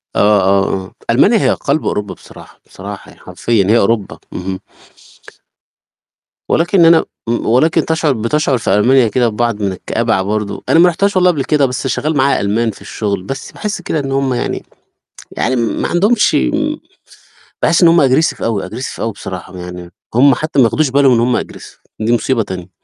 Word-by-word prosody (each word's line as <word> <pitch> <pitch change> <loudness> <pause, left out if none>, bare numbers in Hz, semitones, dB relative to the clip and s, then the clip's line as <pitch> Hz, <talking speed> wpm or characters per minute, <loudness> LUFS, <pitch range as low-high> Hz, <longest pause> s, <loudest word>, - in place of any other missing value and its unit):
آه، 105 -1 +3
آه، 95 +1 +2
آه، - - -15 0.2
ألمانيا 200 - +4
هي - - +2
قلب 145 +2 -1
أوروبا 105 -1 -2
بصراحة، - - -16
بصراحة - - -9
يعني - - -20
حرفيًا، 115 -4 0
هي 110 +3 +4
أوروبا. 105 -1 0 0.2
اهم 95 +1 -5 1.9
ولكن 175 +1 +3
أنا 165 0 +5 0.2
م 120 - -1
ولكن 155 +8 +2
تشعر 160 -2 +1
بتشعر 130 +4 0
في 110 - -1
ألمانيا 125 +4 +4
كده 120 +3 +1
ببعض 115 -1 -2
من 100 -2 0
الكآبة 115 +4 -2
ع 95 - +1
برضه، 105 +1 -3
أنا 160 - +4
ما 175 +1 +6
رحتهاش 195 +4 0
والله 180 -1 +4
قبل 140 -5 -2
كده 145 -2 +2
بس 130 +1 -3
شغال 155 +3 -1
معايا 140 +1 +2
ألمان 110 +3 0
في - - -16
الشغل، 100 -3 -4
بس 135 +7 -7
باحس 210 -3 -5
كده 160 -2 -2
إن 135 -1 -4
هم 135 -1 0
يعني 120 - -3 0.7
يعني 130 +3 0
ما 115 -2 -1
عندهمش 210 +5 +2 1.2
باحس 165 +3 +2
إن 170 - +7
هم 165 -4 +5
aggressive 155 +5 +1
أوي 110 -5 -2
aggressive 125 +6 -6
أوي 115 - -2
بصراحة، 95 -2 -8
يعني 90 0 -9 0.2
هم 135 +1 +5
حتى 155 -1 -2
ما 120 - +6
ياخدوش 150 +5 +1
بالهم 135 0 +3
إن 115 - +2
هم 120 +1 +1
aggressive - - -12 0.2
دي 110 +2 +1
مصيبة 120 -1 0
تانية. 90 -2 -7
120 Hz, 180 wpm, -15 LUFS, 105-155 Hz, 1.9 s, إن